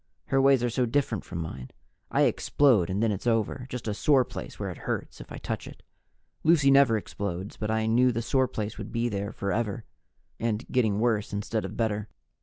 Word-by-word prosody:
Her 135 0 +3
ways 135 -2 +5
are 120 - +2
so 125 +1 +1
different 115 -5 0
from 85 - -6
mine; 65 -6 -6 0.4
I - - +3
explode 120 -12 +3
and 100 +4 0
then 115 - +3
it's 100 +4 -4
over 115 +2 0
just 125 -3 -5
a 105 - 0
sore 130 +4 +3
place - - -8
where - - -3
it - - -10
hurts - - -3
if - - -13
I - - -6
touch - - -4
it. - - -12 0.6
Lucy 155 -4 +5
never 135 -5 +6
explodes, 100 -2 -5
but 105 - -4
I 110 0 +1
knew 125 +3 +4
the 115 0 -2
sore 130 +3 +2
place 110 -3 -5
would - - -6
be 120 0 0
there 100 0 -3
forever, 105 +1 -2 0.5
and 115 0 -1
getting 110 -5 +2
worse 110 -3 0
instead 105 +1 -2
of 95 +3 -7
better. 110 -2 -1
115 Hz, 210 wpm, -27 LUFS, 105-125 Hz, 0.6 s, never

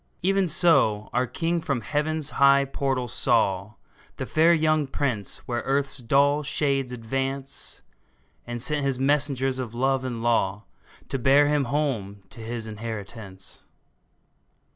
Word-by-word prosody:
Even 195 0 +2
so 140 - +2
our 125 +1 +1
King 165 +7 -1
from 140 -6 -2
Heaven's 150 +5 -1
high 140 0 +6
portals 135 -3 -2
saw 105 -4 +1 0.4
The - - -3
fair 160 +2 +4
young 155 -3 +2
Prince 125 -8 -3
where 120 -1 -1
earth's 140 0 0
dull 140 +4 +3
shades 140 -3 -1
advance, 135 +3 -4 0.6
And 120 0 -4
sent 145 +4 0
his 135 -2 0
messengers 135 -1 +1
of 120 -3 -5
love 135 +1 +1
and 120 -3 -4
law 105 -3 +1 0.5
To 135 - -2
bear 140 +4 +5
him 150 -2 +2
home 120 -8 -2
to - - -13
his 115 0 -5
inheritance 105 -3 -8
135 Hz, 135 wpm, -25 LUFS, 115-145 Hz, 0.6 s, high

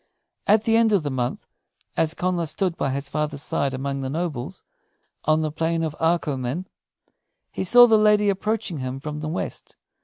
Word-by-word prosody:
At 210 +1 +5
the 225 0 +3
end 230 -1 +4
of 195 -6 +3
the 145 - -2
month, 125 -1 -3 0.5
as 160 0 +1
Connla 175 -2 -1
stood 180 +3 -1
by 140 - -1
his 140 +1 -3
father's 150 0 -2
side 140 -1 0
among 135 +1 -3
the 135 -1 -3
nobles, 155 -4 -4 0.6
on 155 +1 +3
the 155 -1 -1
Plain 165 +1 -1
of 155 -2 -3
Arcomin, 160 -2 0 0.9
he - - -3
saw 245 +6 +8
the 220 -2 +4
lady 210 -1 +4
approaching 200 -3 -1
him 130 +1 -4
from 150 +1 -5
the 155 0 -4
west. 170 - -5
160 Hz, 180 wpm, -23 LUFS, 140-190 Hz, 0.9 s, saw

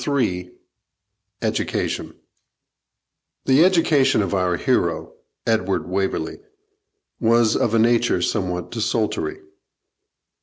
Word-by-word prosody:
CHAPTER 145 -1 0
III 90 -6 -1 0.9
EDUCATION - - -2 1.3
The 135 +4 +5
education 150 - +3
of 95 - -3
our 90 -2 +1
hero, - - 0 0.3
Edward 95 -4 0
Waverley, 95 - -2 0.8
was 115 -1 +3
of 115 -1 +1
a - - +4
nature 115 +1 +3
somewhat 90 -1 -2
desultory. 115 - -2
110 Hz, 90 wpm, -22 LUFS, 95-130 Hz, 1.3 s, The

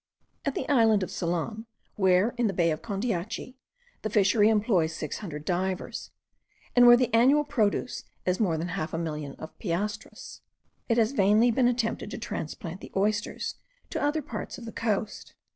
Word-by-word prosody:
At 280 - -1
the 260 - -3
island 225 -7 +4
of 185 - -5
Ceylon, 175 +6 -3 0.3
where, 190 +3 +3
in 240 -2 +1
the 195 - -1
bay 170 -2 +3
of 155 - -3
Condeatchy, 225 +3 -3 0.4
the 215 - -2
fishery 205 +1 +4
employs 205 -7 +2
six 155 - -4
hundred 155 -7 -7
divers, 185 +1 -2 0.7
and 245 0 +8
where 240 0 +9
the 245 -3 0
annual 265 +6 +5
produce 250 -4 -1 0.2
is 180 0 +1
more 180 -8 +1
than 170 +2 -3
half 170 -3 -3
a - - -1
million 150 -4 -4
of 155 - -10
piastres, 205 +3 -4 0.5
it 230 - +3
has 225 0 +3
vainly 215 0 +4
been 245 +1 +3
attempted 235 -3 -1
to - - -6
transplant 170 -3 -5
the - - -10
oysters 210 +2 -1 0.3
to - - -2
other 295 +1 0
parts 220 -5 -6
of 235 - -9
the 225 - -6
coast. 215 -2 -3
210 Hz, 175 wpm, -27 LUFS, 180-235 Hz, 0.7 s, where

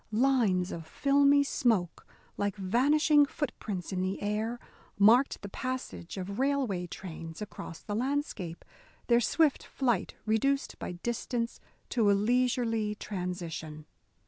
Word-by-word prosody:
Lines 220 -7 +2
of 165 -2 -6
filmy 280 - +4
smoke, 220 - 0 0.3
like 205 0 -1
vanishing 290 - +4
footprints 215 - -4
in 185 - -1
the 185 +1 -1
air, 215 +3 -2 0.4
marked 230 +7 +5
the - - -4
passage 225 - -5
of 200 +3 -5
railway 260 -10 0
trains 165 -2 -8
across 205 -5 -7
the 205 - -5
landscape 235 - -2 0.4
their 235 0 +4
swift 310 +3 +2
flight 240 -8 -1
reduced 275 +6 +1
by - - -4
distance 235 +4 -3 0.3
to 225 -5 +3
a - - +6
leisurely 225 -1 +1
transition. 175 -6 -5
220 Hz, 120 wpm, -30 LUFS, 185-260 Hz, 0.4 s, a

